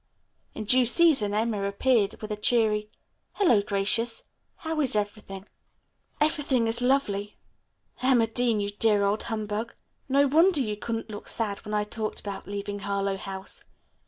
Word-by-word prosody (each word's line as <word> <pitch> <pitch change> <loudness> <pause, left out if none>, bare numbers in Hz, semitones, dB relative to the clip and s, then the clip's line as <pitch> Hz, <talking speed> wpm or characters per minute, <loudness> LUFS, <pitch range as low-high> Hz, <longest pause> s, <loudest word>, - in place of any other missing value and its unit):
In 215 - -4
due 250 +4 +4
season 245 -7 +4
Emma 215 -2 0
appeared 205 +1 +1
with 215 - -5
a - - -1
cheery, 215 -1 +1 0.4
"Hello, 255 - +3
Gracious. 205 +3 0 0.3
How 320 -1 -3
is 260 -6 +2
everything?" 205 -2 -4 0.7
"Everything 295 -5 +1
is 225 +2 -1
lovely. 210 -6 0 0.6
Emma 255 -3 +4
Dean, 230 -1 0
you 205 0 -2
dear 205 0 +2
old 200 +2 +1
humbug. 215 0 -4 0.3
No 280 +2 +4
wonder 325 +4 +4
you 215 -5 -1
couldn't 225 +1 -5
look 205 - -8
sad 210 -3 -2
when 210 0 -4
I 210 - +1
talked 215 +1 -4
about 200 -1 -7
leaving 205 0 -5
Harlowe 200 -1 -1
House. 190 0 -6
215 Hz, 150 wpm, -26 LUFS, 205-245 Hz, 0.7 s, due